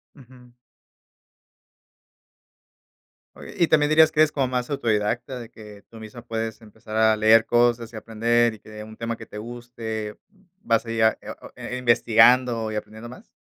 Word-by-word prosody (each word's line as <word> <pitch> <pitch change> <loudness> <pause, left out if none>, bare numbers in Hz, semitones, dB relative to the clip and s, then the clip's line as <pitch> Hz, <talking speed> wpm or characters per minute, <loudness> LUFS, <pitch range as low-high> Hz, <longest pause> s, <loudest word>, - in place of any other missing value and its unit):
Ujú. 125 -3 -18 2.8
Oye, - - -12
¿y 170 - +2
también 150 -1 +3
dirías 155 0 +5
que 155 - -8
eres 155 -1 +4
como 135 -4 -1
más 125 0 -3
autodidacta 120 -1 -2
de 120 -1 -10
que 105 -3 -14
tú 115 - -14
misma 110 +2 -11
puedes 115 0 -4
empezar 110 0 -10
a 110 0 +4
leer 110 +1 +4
cosas 120 -1 +1
y - - -10
aprender 115 +2 0
y - - -14
que - - -20
de 105 0 -9
un 110 0 -12
tema 115 0 -4
que - - -11
te 105 - -11
guste 115 -2 -7 0.5
vas 115 0 +1
ahí 115 -1 -4
a 110 0 +3
eo - - -8 0.2
eh, - - -9
eh, - - -3
investigando 115 -1 +3
y - - -5
aprendiendo 110 +2 -7
más? 125 - -14
115 Hz, 175 wpm, -23 LUFS, 110-125 Hz, 2.8 s, dirías